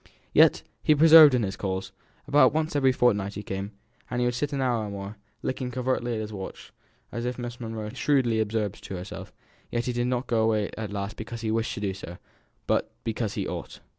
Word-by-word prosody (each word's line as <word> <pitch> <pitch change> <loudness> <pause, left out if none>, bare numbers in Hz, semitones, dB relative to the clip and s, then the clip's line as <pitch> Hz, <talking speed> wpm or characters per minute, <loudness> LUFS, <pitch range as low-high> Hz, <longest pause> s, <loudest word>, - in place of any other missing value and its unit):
Yet - - +5 0.2
he 155 - +4
persevered 155 -2 +9
in 120 - +1
his 95 -1 -2
calls; 95 -1 -3 0.4
about 145 +1 +5
once 155 -1 0
every 135 -2 +4
fortnight 105 -6 +1
he 105 - -5
came, 100 +1 -5 0.4
and 120 - -2
would 120 0 +1
sit 145 +5 -2
an 140 - -2
hour 120 -4 +1
or - - -5
more, 100 +1 -7 0.3
looking 130 -1 -2
covertly 125 -1 -1
at 110 - -2
his 110 0 -6
watch, 95 -2 -8 0.4
as 120 - -4
if 125 +1 -2
as - - -18
Miss 120 0 -6
Monro 110 -2 -5
shrewdly 120 -2 +1
observed 105 -2 -2
to 95 - -5
herself, 90 +2 -7 0.4
he 120 - -1
did 120 0 -1
not 125 +1 -1
go 115 -2 +1
away 110 -2 +1
at 110 -2 -5
last 100 +1 -4
because 115 +1 -6
he 110 -1 -1
wished 115 +1 -1
to - - -6
do 100 -2 -1
so, 90 -2 -9 0.5
but - - +1
because 110 -1 -2
he - - -2
ought. - - -6
115 Hz, 215 wpm, -26 LUFS, 105-125 Hz, 0.5 s, persevered